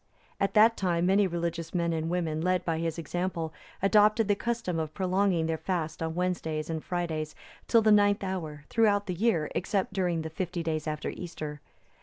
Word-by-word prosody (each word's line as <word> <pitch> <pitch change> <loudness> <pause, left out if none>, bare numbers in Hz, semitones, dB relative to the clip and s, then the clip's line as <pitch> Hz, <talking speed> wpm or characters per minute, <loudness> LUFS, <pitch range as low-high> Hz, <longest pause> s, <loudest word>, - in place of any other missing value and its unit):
At 195 - 0
that 225 +2 +6
time, 175 -2 +1
many 195 +2 +4
religious 170 -1 -3
men 170 -1 +1
and 160 0 -2
women, 165 -3 -1
led 185 +1 +1
by 165 -1 0
his 165 -1 -2
example, 170 -1 -3 0.3
adopted 210 +2 +4
the 205 - +4
custom 230 -6 -2
of 155 -1 -4
prolonging 185 -2 +1
their 160 -1 -1
fast 165 -5 -3
on 160 0 -2
Wednesdays 165 -3 -2
and 160 -1 -3
Fridays, 160 -4 -3 0.3
till 230 -2 +5
the 215 - +5
ninth 205 -1 +4
hour, 160 -6 -4
throughout 205 -3 +3
the 180 - -2
year, 175 -5 +1
except 195 -3 -1
during 175 -4 0
the 160 - -5
fifty 175 0 -3
days 155 -1 -2
after 150 -1 -2
Easter. 155 -4 -7
175 Hz, 185 wpm, -29 LUFS, 160-195 Hz, 0.3 s, that